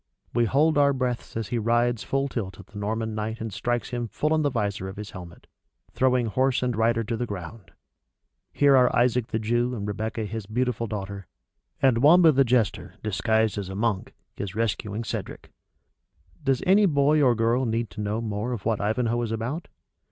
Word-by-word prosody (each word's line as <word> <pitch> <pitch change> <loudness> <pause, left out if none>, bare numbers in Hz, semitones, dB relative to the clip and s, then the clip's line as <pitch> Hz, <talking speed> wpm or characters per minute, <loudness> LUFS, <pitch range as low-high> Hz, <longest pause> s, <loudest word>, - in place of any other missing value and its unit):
We 120 0 +3
hold 145 +5 +3
our 140 -1 +4
breaths 125 -3 -3
as 110 -3 -3
he 120 - -1
rides 120 +1 +1
full 135 +8 -1
tilt 100 -8 -5
at 100 - -11
the 105 - -10
Norman 110 +2 -2
Knight 110 +1 -3
and 110 -2 -5
strikes 120 +4 -2
him 120 -1 -2
full 150 +7 -1
on 155 - +2
the 145 - +2
visor 100 -6 -2
of 95 - -9
his 105 0 -7
helmet, 85 -2 -11 0.5
throwing 125 -2 +2
horse 130 +4 +1
and 125 -2 0
rider 115 +1 +2
to 115 +2 -3
the 120 +2 -3
ground. 95 0 -8 0.8
Here 140 -1 +4
are 125 -1 +4
Isaac 125 -1 +2
the - - -2
Jew 120 +3 0
and 105 -2 -4
Rebecca 110 +2 -3
his 105 0 -6
beautiful 120 0 -1
daughter; 100 -3 -6 0.6
and 130 -4 +4
Wamba 160 +5 +7
the 135 -1 +4
jester, 120 -4 0
disguised 110 +2 +1
as 95 -2 -5
a 95 - -6
monk, 105 -2 -1 0.2
is 100 -1 -5
rescuing 110 -1 -2
Cedric - - -6 0.9
Does 135 -2 +1
any 200 +2 +5
boy 150 -1 +3
or 125 -4 +4
girl 115 +3 +1
need 115 0 -1
to - - -6
know 105 +2 -2
more 110 +2 -3
of 110 -5 -6
what 110 -2 0
Ivanhoe 115 +3 0
is 115 -2 -3
about? 120 +9 -3
115 Hz, 195 wpm, -25 LUFS, 105-125 Hz, 0.9 s, Wamba